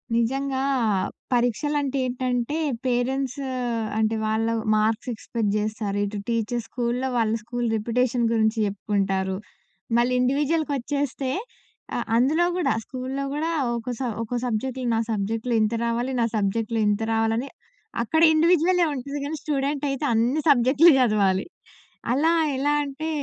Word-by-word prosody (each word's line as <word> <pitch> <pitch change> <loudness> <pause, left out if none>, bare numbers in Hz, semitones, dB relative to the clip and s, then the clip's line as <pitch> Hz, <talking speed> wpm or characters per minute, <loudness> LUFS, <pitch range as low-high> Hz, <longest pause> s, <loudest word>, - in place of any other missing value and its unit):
నిజంగా 265 +3 0 0.7
పరీక్షలంటే 275 +4 0
ఏంటంటే, 250 +2 -1 0.3
పేరెంట్స్ 255 +2 0 0.6
అంటే, 220 0 +1
వాళ్ళ 220 +1 0
వ్ - - -5
మార్క్స్ 220 +3 0
ఎక్స్‌పెక్ట్ 220 -1 -2
జేస్తారు. 210 -1 -2
ఇటు 205 +1 -5
టీచర్స్ 230 0 -1
స్కూల్లో, 245 +1 -1
వాళ్ళ 225 -1 +2
స్కూలు 240 +1 -2
రిప్యుటేషన్ 240 +2 0
గురించి 220 0 +2
జెప్పుకుంటారు. 195 -1 -1 0.6
మళ్ళీ 240 +1 +2
ఇండివిడ్యువల్‌కొచ్చేస్తే 280 -1 0 0.6
అ - - 0 0.2
అందులో 280 +8 +3
గూడా, 360 - +1
స్కూల్లో 260 +2 -4
గూడా 315 +3 -1 0.2
ఒక్కో 235 +1 -3
స - - -6 0.2
ఒక్కో 230 +2 -3
సబ్జెక్ట్‌లో 250 +2 -2
నా 225 - +1
సబ్జెక్ట్‌లో 220 +3 -1
ఇంత 215 +1 +1
రావాలి, 235 +3 -1
నా - - +3
సబ్జెక్ట్‌‌లో 220 +2 0
ఇంత 205 +1 0
రావాలని, 225 +4 0 0.5
అక్కడ 320 +7 +1
ఇండివిడ్యువలే 345 +2 +4
ఉంటది 280 +2 -5
గానీ, 310 +2 -3
స్టూడెంటయితే 280 -1 -1
అన్ని 240 +7 +2
సబ్జెక్టులు 280 +5 +6
జదవాలి. 200 -6 +2 0.7
అలా 315 +6 +3 0.3
ఎలా 290 +2 +1
అంటే, 290 +3 -5
245 Hz, 125 wpm, -24 LUFS, 225-275 Hz, 0.7 s, సబ్జెక్టులు